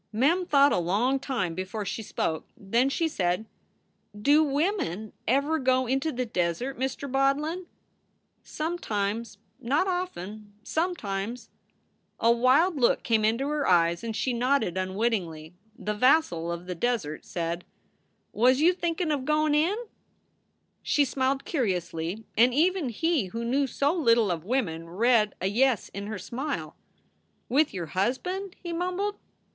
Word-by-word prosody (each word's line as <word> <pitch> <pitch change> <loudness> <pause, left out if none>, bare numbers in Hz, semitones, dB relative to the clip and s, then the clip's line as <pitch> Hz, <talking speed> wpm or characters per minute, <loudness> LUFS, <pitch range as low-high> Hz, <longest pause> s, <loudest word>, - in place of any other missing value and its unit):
Mem 310 +11 +2
thought 285 -2 +5
a - - +2
long 215 +10 +1
time 250 - -2
before 190 +4 -4
she 225 - -3
spoke. 160 -6 -3
Then 235 +7 +1
she 325 +4 0
said: 180 - -1 0.7
"Do 290 +8 +5
women 285 - -1
ever 280 +6 +2
go 260 0 +2
into 270 +5 0
the 250 -1 -2
desert, 200 +6 -2
Mr. 265 +2 -2
Bodlin?" 285 +7 0 0.7
Sometimes; 230 -10 -3 0.2
not 285 +10 +1
often. 215 - -4
Sometimes. 240 - -3 0.7
A 230 - +4
wild 265 +9 +3
look 245 -3 +2
came 225 -2 +2
into 230 +6 +1
her 300 -1 -1
eyes 170 0 +3
and 225 -1 -3
she 255 +2 0
nodded 240 -6 +1
unwittingly. 185 -5 -2 0.2
The 210 - -3
vassal 210 - +2
of 170 +1 -5
the 180 - -4
desert 180 -7 -2
said: 170 0 -3 0.7
"Was 255 +4 +4
you 340 +4 +5
thinkin 340 -2 -1
of 285 -3 -1
goin 305 +1 +2
in?" 330 +8 +2 1.0
She 290 - +2
smiled 265 +1 -1
curiously, 185 - -2
and 240 +2 +4
even 345 -1 +2
he 315 - 0
who 230 +5 -5
knew 270 +4 +1
so 280 +4 +1
little 230 - +3
of 165 -2 -3
women 175 -9 -1
read 215 +2 +2
a - - -3
yes 235 +3 +2
in 200 +1 -6
her 215 0 -4
smile. 265 +9 -4 0.7
"With 295 +4 +2
your 175 -3 -4
husband?" 360 - -1
he 345 -1 -4
mumbled. 365 +4 -2
245 Hz, 140 wpm, -27 LUFS, 200-295 Hz, 1.0 s, thought